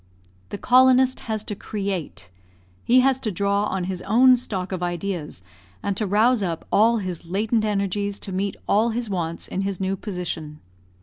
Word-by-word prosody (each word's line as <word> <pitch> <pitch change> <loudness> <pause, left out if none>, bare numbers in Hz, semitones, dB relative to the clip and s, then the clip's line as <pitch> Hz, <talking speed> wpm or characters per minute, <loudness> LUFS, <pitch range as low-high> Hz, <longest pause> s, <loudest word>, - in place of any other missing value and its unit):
The - - -5
colonist 255 +3 +4
has 215 -1 -1
to 215 - -5
create 195 - -5 0.5
he 255 +2 +5
has 265 0 +2
to 220 -5 -3
draw 200 +2 0
on 190 -3 -2
his 185 0 -4
own 250 +5 +5
stock 195 -7 -4
of 185 -2 -3
ideas, 175 - -4 0.4
and 200 - -1
to 210 +1 -2
rouse 220 +4 +3
up 170 -4 -3
all 230 +3 +4
his 180 -5 -5
latent 215 +5 0
energies 200 0 -1
to 195 - -6
meet 195 +1 -2
all 220 +3 +3
his 230 -1 -3
wants 170 -3 -3
in 190 - -3
his 195 -2 -3
new 190 0 -1
position. 175 -6 -5
200 Hz, 175 wpm, -23 LUFS, 185-220 Hz, 0.5 s, he